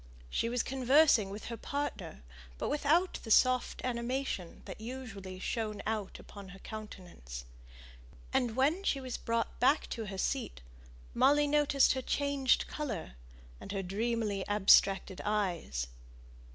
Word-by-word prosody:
She 230 Hz, -, 0 dB
was 245 Hz, 0 st, 0 dB
conversing 265 Hz, -4 st, +4 dB
with 205 Hz, +2 st, -7 dB
her 230 Hz, -, -5 dB
partner, 280 Hz, -, -4 dB, 0.3 s
but -, -, -2 dB
without 305 Hz, +5 st, +2 dB
the 225 Hz, -, -9 dB
soft 255 Hz, +3 st, +3 dB
animation 240 Hz, -6 st, -3 dB
that -, -, -8 dB
usually 220 Hz, -6 st, -7 dB
shone 215 Hz, +1 st, -3 dB
out 215 Hz, -3 st, -3 dB
upon 200 Hz, -2 st, -11 dB
her 195 Hz, -, -11 dB
countenance. 180 Hz, -, -9 dB, 0.9 s
And 235 Hz, -3 st, +1 dB
when 300 Hz, +9 st, +2 dB
she 280 Hz, -, +1 dB
was 255 Hz, -2 st, -5 dB
brought 230 Hz, 0 st, -2 dB
back 275 Hz, +5 st, +3 dB
to 225 Hz, -, -3 dB
her 195 Hz, -1 st, -6 dB
seat -, -, -2 dB, 0.5 s
Molly 290 Hz, +1 st, +4 dB
noticed 290 Hz, -1 st, +4 dB
her 260 Hz, -, -2 dB
changed 280 Hz, -1 st, +1 dB
colour, 245 Hz, -, -5 dB, 0.5 s
and -, -, -8 dB
her 195 Hz, -1 st, -2 dB
dreamily 210 Hz, +1 st, -1 dB
abstracted 195 Hz, -2 st, +4 dB
eyes. 180 Hz, -, -1 dB
230 Hz, 135 wpm, -32 LUFS, 195-265 Hz, 0.9 s, conversing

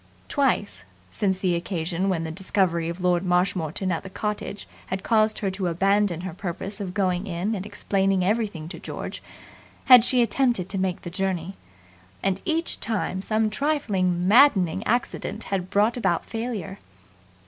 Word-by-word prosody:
Twice, 260 Hz, -, 0 dB, 0.3 s
since 190 Hz, -, 0 dB
the 185 Hz, -2 st, +1 dB
occasion 170 Hz, +1 st, -1 dB
when 170 Hz, -4 st, 0 dB
the 160 Hz, -, -4 dB
discovery 170 Hz, -2 st, 0 dB
of 170 Hz, +2 st, -6 dB
Lord 180 Hz, 0 st, +2 dB
Marshmoreton 180 Hz, -1 st, 0 dB
at 165 Hz, -, -1 dB
the 190 Hz, -, -9 dB
cottage 210 Hz, 0 st, -4 dB, 0.2 s
had 190 Hz, 0 st, -3 dB
caused 215 Hz, -1 st, +3 dB
her 195 Hz, -, +1 dB
to 190 Hz, -1 st, -2 dB
abandon 195 Hz, 0 st, +2 dB
her 185 Hz, -2 st, -5 dB
purpose 195 Hz, +3 st, -5 dB
of 185 Hz, -1 st, -5 dB
going 185 Hz, -1 st, 0 dB
in 185 Hz, +4 st, -2 dB
and 200 Hz, -1 st, -4 dB
explaining 195 Hz, -2 st, 0 dB
everything 200 Hz, -6 st, -1 dB
to -, -, -8 dB
George, -, -, -6 dB, 0.6 s
had 250 Hz, -3 st, +9 dB
she 250 Hz, 0 st, +3 dB
attempted 235 Hz, -7 st, +1 dB
to 195 Hz, 0 st, -2 dB
make 185 Hz, -1 st, -1 dB
the 175 Hz, -, -6 dB
journey; 190 Hz, -1 st, -2 dB, 0.7 s
and 195 Hz, -1 st, 0 dB
each 330 Hz, +1 st, -1 dB
time 205 Hz, -4 st, -2 dB
some 215 Hz, +1 st, +1 dB
trifling, 195 Hz, -, 0 dB
maddening 200 Hz, -, +5 dB
accident 240 Hz, +3 st, -1 dB
had 185 Hz, -1 st, -1 dB
brought 210 Hz, +4 st, +2 dB
about 190 Hz, -7 st, 0 dB
failure. 225 Hz, -5 st, -4 dB
190 Hz, 160 wpm, -25 LUFS, 180-210 Hz, 0.7 s, had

